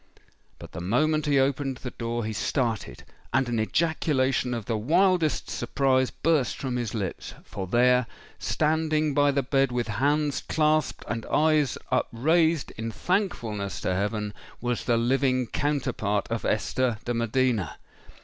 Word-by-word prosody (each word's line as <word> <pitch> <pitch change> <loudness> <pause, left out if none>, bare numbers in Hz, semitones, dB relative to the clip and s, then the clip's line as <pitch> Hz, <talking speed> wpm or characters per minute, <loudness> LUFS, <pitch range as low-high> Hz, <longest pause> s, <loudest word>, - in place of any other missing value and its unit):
But - - -11
the 80 - -6
moment 150 - +1
he 145 -1 +3
opened 135 0 +1
the 125 -1 -7
door, 115 -1 -3
he 110 - -3
started—and 120 +3 -2
an 120 -2 -1
ejaculation 130 -2 +1
of 115 -3 -5
the 115 - -1
wildest 165 - +2
surprise 130 -2 +1
burst 155 -5 0
from 130 -2 -3
his 120 -2 -2
lips. 100 -5 -4
For 95 -1 -6
there—standing 150 - +1
by 145 0 +4
the 140 -1 +1
bed, 135 0 +2
with 120 -1 -1
hands 145 +5 +1
clasped 155 -1 +1
and 115 -1 -3
eyes 155 -3 +2
upraised 160 +5 +2
in 115 0 -2
thankfulness 115 - -2
to 95 - 0
heaven—was 105 +4 -3
the 120 -2 +2
living 130 +1 +2
counterpart 120 -7 -1
of 115 - -2
Esther 120 +2 0
de 120 - -1
Medina! 115 - 0
130 Hz, 135 wpm, -26 LUFS, 115-150 Hz, -, by